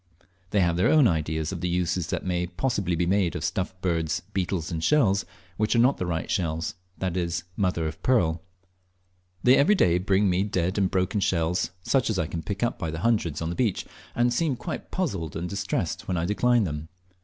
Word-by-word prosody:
They 100 - +2
have 85 -1 +2
their 90 - +3
own 150 -5 +6
ideas 80 -3 -1
of 90 -3 -5
the 90 - -1
uses 90 -1 0
that - - -3
may 90 -1 0
possibly 90 -1 -1
be 85 +1 +1
made 95 -1 +1
of 80 - -4
stuffed 90 +3 -2
birds, 80 -3 0
beetles, 95 -3 -2
and 80 -1 -3
shells 105 - +3 0.3
which 110 +2 +1
are - - +4
not 125 +4 +4
the 90 - -3
right 80 -2 -2
shells 80 -3 -1 0.2
that 90 -2 -2
is, 85 -1 -1
"mother 90 -5 0
of 80 -1 -5
pearl." 85 -11 +2 1.0
They 125 +1 +7
every 175 +11 +5
day 90 - +3
bring 95 +2 +2
me 90 0 +2
dead 95 -1 0
and 95 -2 +2
broken 95 +2 0
shells, 90 -1 +1
such 130 +2 +2
as 110 - 0
I 80 - +1
can 80 +1 -4
pick 100 +5 -4
up 120 - -1
by 80 - -2
hundreds 85 -3 0
on 80 - -2
the - - -4
beach, 110 -4 0 0.3
and 120 0 +2
seem 145 +1 +1
quite 160 +6 -6
puzzled 100 - -2
and 85 +2 -3
distressed 100 +2 -2
when 90 - -1
I 85 - 0
decline 120 +4 +3
them. 75 -3 -4
90 Hz, 210 wpm, -26 LUFS, 85-105 Hz, 1.0 s, They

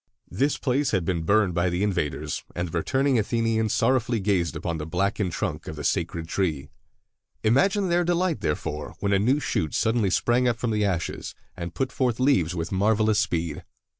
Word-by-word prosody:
This 140 +3 +1
place 135 +1 0
had 95 -6 0
been 85 -1 0
burned 100 +2 +2
by 85 +1 +1
the 90 +3 -1
invaders, 90 -8 -2
and 85 +1 -2
the 80 - -7
returning 135 - +1
Athenians 110 0 0
sorrowfully 120 -3 +2
gazed 95 -5 0
upon 85 -1 -3
the 75 - -5
blackened 95 +2 0
trunk - - -3
of - - -5
the 75 - -6
sacred 80 +3 -1
tree. 80 -7 -1 0.7
Imagine 190 - +3
their 175 +1 +3
delight, 175 - 0
therefore, 75 -2 -3
when 100 0 0
a 100 - +4
new 130 +8 +2
shoot 80 - -1
suddenly 110 -3 +2
sprang 120 +7 +2
up 120 -2 +1
from 115 -1 -1
the 105 -1 +1
ashes, 95 -4 -2 0.2
and 85 -1 -6
put 135 -1 -1
forth 125 -3 0
leaves 95 - +2
with 85 0 -3
marvelous 105 +2 +2
speed. 85 -8 -1
105 Hz, 185 wpm, -25 LUFS, 85-120 Hz, 0.7 s, a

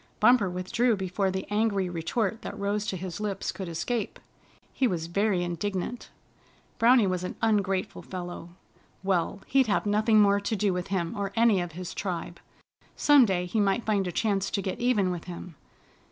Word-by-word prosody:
Bumper 220 -3 +5
withdrew 185 +7 +1
before 190 0 -1
the 190 0 -3
angry 205 -3 +1
retort 190 +6 -2
that 205 - -7
rose 205 +1 -1
to 190 - -2
his 180 0 -6
lips 205 -2 -2
could 190 -3 -6
escape. 220 +7 -3 0.5
He 260 - +2
was 170 -6 -2
very 190 +1 +1
indignant. 185 +6 -3 0.7
Browny 235 -1 +6
was 185 -1 -1
an 180 - -4
ungrateful 200 -4 0
fellow. 175 -2 -7 0.5
Well, 190 0 0
he'd 270 -2 +3
have 210 - +1
nothing 215 +1 +3
more 200 -1 +5
to 205 +2 -2
do 205 -2 +1
with 180 0 -3
him 175 -4 -2
or 200 -1 -3
any 225 -5 +4
of 175 -2 -5
his 180 +1 -6
tribe. 175 -3 -4 0.6
Some 290 -4 +6
day 180 -4 0
he 195 +5 -1
might 205 +3 +1
find 200 -3 +1
a - - -2
chance 200 -1 0
to 200 - -1
get 190 - -3
even 230 -7 +2
with 175 -2 -5
him. 180 -1 -8
195 Hz, 180 wpm, -27 LUFS, 180-215 Hz, 0.7 s, Browny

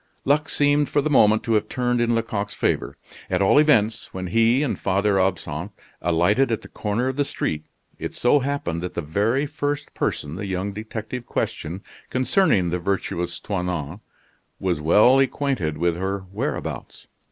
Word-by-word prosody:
Luck 150 +3 +2
seemed 145 0 +2
for - - +2
the 150 +2 0
moment 110 -5 +5
to 115 - 0
have 105 0 +1
turned 125 -1 0
in 120 0 +2
Lecoq's 105 -3 -2
favor. - - -1 0.3
At 90 - +1
all 100 +8 +5
events, 115 -7 +3
when 95 0 -5
he 115 +8 +3
and 140 - -2
Father 100 +1 +1
Absinthe 95 -1 -2 0.3
alighted 90 +10 +2
at 115 - -1
the - - -10
corner 110 +4 -2
of 130 +1 -2
the 145 - +3
street, 80 - -3 0.3
it - - -5
so 125 +4 +4
happened 135 -12 -2
that 90 - -5
the - - -1
very 105 - +1
first 145 0 -3
person 75 +3 -2
the 100 - -4
young 95 +2 -2
detective 110 +3 -6
questioned 85 +5 -3 0.3
concerning 130 - +2
the 90 - -1
virtuous 90 -2 -2
Toinon 90 -4 -3 0.6
was 90 -5 -1
well 105 - +5
acquainted 130 - 0
with 85 0 +1
her 95 +2 -2
whereabouts. - - -4
105 Hz, 165 wpm, -23 LUFS, 90-130 Hz, 0.6 s, moment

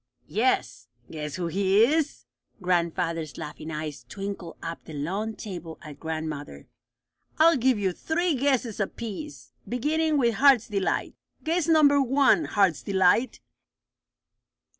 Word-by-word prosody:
"Yes. 240 +5 0 0.2
Guess 150 -2 -5
who 180 - -3
he 195 +4 +3
is?" 300 +4 0 0.3
Grandfather's 170 -3 -1
laughing 155 +1 -7
eyes 155 -2 -5
twinkled 195 -4 -6
up 165 0 -6
the 160 - -10
long 195 +10 -3
table 175 -6 -7
at 150 -3 -10
grandmother. 155 - -5 0.7
"I'll 330 +2 +6
give 255 -2 +2
you 195 -2 0
three 335 - -1
guesses 260 -5 0
apiece, 230 +8 -5 0.2
beginning 305 +5 +1
with 235 -4 +2
Heart's 270 -3 +5
Delight. 200 -4 -1 0.3
Guess 330 +1 0
number 295 -3 +5
one, 275 +4 +3
Heart's 195 -7 +2
Delight." 200 +5 +2
205 Hz, 120 wpm, -26 LUFS, 165-275 Hz, 0.7 s, I'll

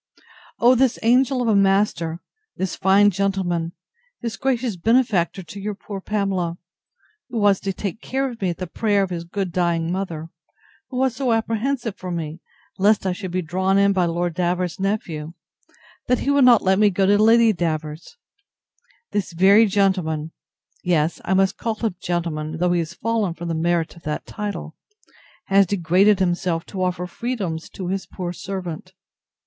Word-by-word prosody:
O 245 +2 +5
this 255 -1 +2
angel 250 +2 +3
of - - -1
a 220 - +3
master! 195 -4 +2 0.4
this 190 0 -2
fine 200 +2 +4
gentleman! 180 -3 -1 0.5
this 230 -3 -3
gracious 245 0 -1
benefactor 195 -3 +1
to 180 +5 -10
your 205 +1 -4
poor 200 -1 -7
Pamela! 190 -5 -1 0.7
who 240 - -4
was 205 -2 +3
to 195 - -2
take 200 +2 -5
care 270 +1 -1
of 235 -4 -8
me 190 - +1
at 170 - -3
the 185 - -4
prayer 205 +2 +1
of 190 - -4
his 170 -1 -3
good 185 +2 -3
dying 170 -2 0
mother; 170 -4 -4 0.6
who 255 - -5
was 260 -1 +1
so 255 -2 0
apprehensive 225 +1 -1
for 185 - -7
me, 165 -2 -4 0.4
lest 205 +1 +3
I 190 - +1
should 185 0 -6
be 180 +1 -2
drawn 185 +4 +1
in 200 0 +4
by 185 -2 +2
Lord 170 0 -1
Davers's 180 +1 -1
nephew, 170 -6 -2 0.7
that 250 - +3
he 280 - 0
would 280 -2 +5
not 240 -3 +6
let 190 +1 +3
me 210 -1 +5
go 195 0 +1
to 205 +2 +4
Lady 225 0 +5
Davers's: 160 - -4 0.9
This 200 -4 -2
very 200 +6 +6
gentleman 185 -6 0 0.5
(yes, 165 -2 +1
I 190 - +1
must 190 0 +2
call 225 -2 -2
him 215 -4 -2
gentleman, 160 -3 -2
though 180 +1 +1
he 175 - +2
has 170 +1 -4
fallen 220 -6 -1
from 170 0 -6
the - - -1
merit 170 +1 0
of 170 - -15
that 150 -1 -4
title) 200 -7 -5 0.7
has 195 0 +4
degraded 190 +3 +3
himself 175 -2 0
to 190 - -3
offer 180 -1 -1
freedoms 185 -5 -4
to 185 -2 -4
his 190 -2 -3
poor 175 -1 -5
servant! 185 -1 -6
190 Hz, 175 wpm, -22 LUFS, 175-210 Hz, 0.9 s, not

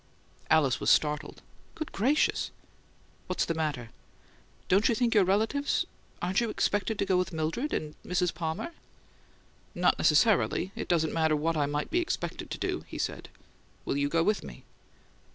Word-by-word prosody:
Alice 145 -5 +3
was - - 0
startled. 150 0 +1 0.3
"Good 315 - -5
gracious!" 270 +9 +1 0.8
"What's 185 - 0
the 165 - -1
matter?" 145 -8 -3 0.8
"Don't 195 +3 +4
you 235 - +2
think 235 0 +1
your 210 -3 +6
relatives 220 +10 +1 0.4
Aren't 185 +5 +1
you 235 - 0
expected 205 0 0
to 200 - 0
go 190 -2 +2
with 180 0 0
Mildred 165 - -2
and 150 -1 -3
Mrs. 180 -1 0
Palmer?" 160 - -3 1.0
"Not - - +2
necessarily. 190 - +3
It - - -4
doesn't 160 -3 +1
matter 160 -1 +2
what 160 +2 0
I 145 -2 +1
might 145 +1 -2
be 350 - +2
expected 340 - -3
to - - -4
do," - - -2
he - - -7
said. - - -3 0.6
"Will - - -1
you 140 0 +1
go 165 +2 +2
with 210 +3 +1
me?" - - -10
175 Hz, 165 wpm, -29 LUFS, 155-210 Hz, 1.0 s, your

